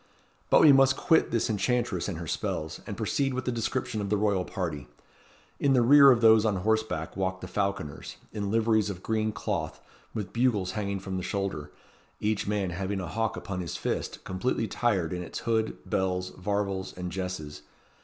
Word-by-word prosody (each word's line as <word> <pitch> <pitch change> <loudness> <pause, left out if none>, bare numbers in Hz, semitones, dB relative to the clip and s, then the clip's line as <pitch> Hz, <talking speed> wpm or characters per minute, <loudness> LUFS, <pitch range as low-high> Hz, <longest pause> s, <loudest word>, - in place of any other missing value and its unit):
But - - +6
we 150 - +9
must 135 -1 +5
quit 165 -3 +3
this 115 - 0
enchantress 115 -3 0
and 95 -5 -3
her 85 - -6
spells, 80 0 -3
and - - -5
proceed 135 -2 0
with 130 - -3
the 125 - 0
description 110 -2 -2
of 100 - -3
the 105 - +2
royal 100 -3 +1
party. 80 -7 -4 0.7
In 140 -1 +3
the 125 -2 +4
rear 140 +3 +8
of 120 -3 +5
those 110 -1 +7
on 110 -3 +1
horseback 110 -4 -1
walked 95 -1 -2
the - - -6
falconers, 100 -7 -3 0.2
in 100 -1 -3
liveries 110 -1 +2
of 95 -2 -6
green 110 -1 0
cloth, - - -3 0.4
with 100 -4 -4
bugles 115 -7 +1
hanging 100 -2 -2
from 95 0 -4
the - - -2
shoulder; 95 -6 -3 0.5
each 105 -1 -1
man 100 -3 0
having 95 +3 -3
a 90 - -4
hawk 110 +2 -2
upon 90 -2 -5
his 85 -3 -4
fist, - - -3
completely 110 +4 -1
'tired 95 -10 0
in 90 - -3
its 85 - -6
hood, 110 -2 0
bells, 90 -1 -1
varvels, 100 -1 -3
and 90 -1 -4
jesses. 90 -6 -5
100 Hz, 185 wpm, -28 LUFS, 90-115 Hz, 0.7 s, we